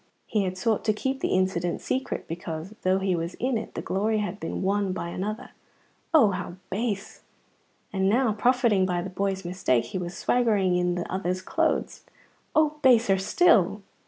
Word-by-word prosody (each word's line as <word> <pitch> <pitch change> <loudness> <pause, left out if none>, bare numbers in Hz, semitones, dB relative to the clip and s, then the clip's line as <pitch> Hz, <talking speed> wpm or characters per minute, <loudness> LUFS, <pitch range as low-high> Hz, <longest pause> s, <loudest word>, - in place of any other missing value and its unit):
He 210 -3 0
had 185 0 -3
sought 220 +3 0
to 215 - +3
keep 265 +5 -2
the - - 0
incident 185 -2 0
secret 260 0 -3
because, 165 +2 -6
though 185 +1 +2
he 190 -1 0
was 170 +1 -3
in 255 +1 -1
it, 220 - -4
the - - -4
glory 215 +3 0
had 205 -1 -3
been 165 - -4
won 195 0 +1
by 170 -2 -4
another 210 +6 -4 0.6
(oh, 280 -11 +6
how 175 -1 -5 0.2
base!), 205 0 -3 0.7
and 190 -1 +2
now, 235 +1 +3
profiting 230 -4 +3
by 175 -1 -1
the 190 - -6
boy's 195 0 -2
mistake, 130 -10 +1
he 155 +10 -4
was 175 0 -5
swaggering 210 -7 +2
in 180 0 +1
that 175 - -3
other's 185 0 -2
clothes - - 0 0.5
(oh, 305 -1 +2
baser 230 -8 +5
still!). 205 - +3
195 Hz, 175 wpm, -26 LUFS, 180-225 Hz, 0.7 s, oh